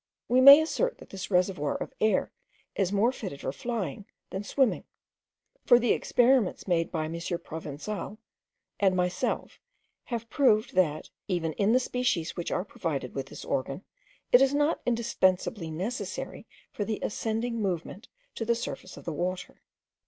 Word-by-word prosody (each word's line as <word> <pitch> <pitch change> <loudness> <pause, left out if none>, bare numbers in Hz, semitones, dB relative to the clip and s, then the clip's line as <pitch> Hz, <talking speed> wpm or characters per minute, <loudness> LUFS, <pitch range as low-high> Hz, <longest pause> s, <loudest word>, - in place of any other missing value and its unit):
We 255 +1 +4
may 280 +3 +11
assert - - -1
that - - -15
this 190 -2 -6
reservoir 180 -6 +1
of - - -5
air 215 0 +2 0.4
is 190 -2 0
more 210 +5 +3
fitted 190 - -7
for - - -2
flying 205 - -4 0.2
than 190 +2 -4
swimming; 260 +3 +1 0.8
for 245 - +7
the 240 0 +2
experiments 245 -6 +2
made 165 -2 +1
by 160 -2 -1
M. 160 - -5
Provenzal 170 +3 -5 0.6
and 190 -2 +3
myself 180 0 -1 0.5
have 230 -2 -4
proved, 230 -5 +2
that, 155 -5 +1 0.2
even 170 -5 -1
in 205 +6 +2
the 255 - +5
species 250 -10 -1
which 175 - -3
are - - -1
provided - - -4
with - - -4
this - - -9
organ, - - -2 0.5
it 245 - +8
is 270 +1 +4
not 295 +2 +1
indispensably 205 -5 +1
necessary 190 - -5 0.2
for 205 - -3
the 215 0 -2
ascending 225 +2 -2
movement 190 +4 -3 0.3
to - - -4
the 235 +1 +2
surface 205 -5 -6
of - - -12
the 165 - -3
water. 180 +4 -4
200 Hz, 155 wpm, -28 LUFS, 175-240 Hz, 0.8 s, may